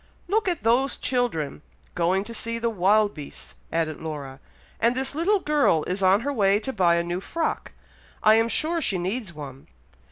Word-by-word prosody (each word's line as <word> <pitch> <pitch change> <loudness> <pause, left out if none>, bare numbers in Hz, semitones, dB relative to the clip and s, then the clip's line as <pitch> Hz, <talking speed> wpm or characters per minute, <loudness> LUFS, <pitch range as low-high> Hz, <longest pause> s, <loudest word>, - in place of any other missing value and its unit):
"Look 420 +3 +1
at 350 -4 -1
those 245 +5 +2
children, 235 - -2 0.3
going 180 +3 +1
to 230 - -8
see 230 +1 -3
the 230 0 -1
wild 205 +1 +3
beasts," 145 -2 -9 0.2
added 160 -2 -1
Laura, 145 -4 -6 0.4
"and 235 +2 +2
this 265 +2 -1
little 365 +7 +2
girl 290 - +2
is 185 +2 -3
on 190 +3 +4
her 285 +3 -2
way 200 -4 +3
to 265 +4 -4
buy 175 -4 +3
a 170 - +1
new 175 +2 -3
frock. 330 +10 -3 0.5
I 215 - +7
am 225 +1 +3
sure 330 +6 0
she 195 -9 +1
needs 190 +3 -3
one! 140 -4 -10
210 Hz, 185 wpm, -25 LUFS, 170-260 Hz, 0.5 s, I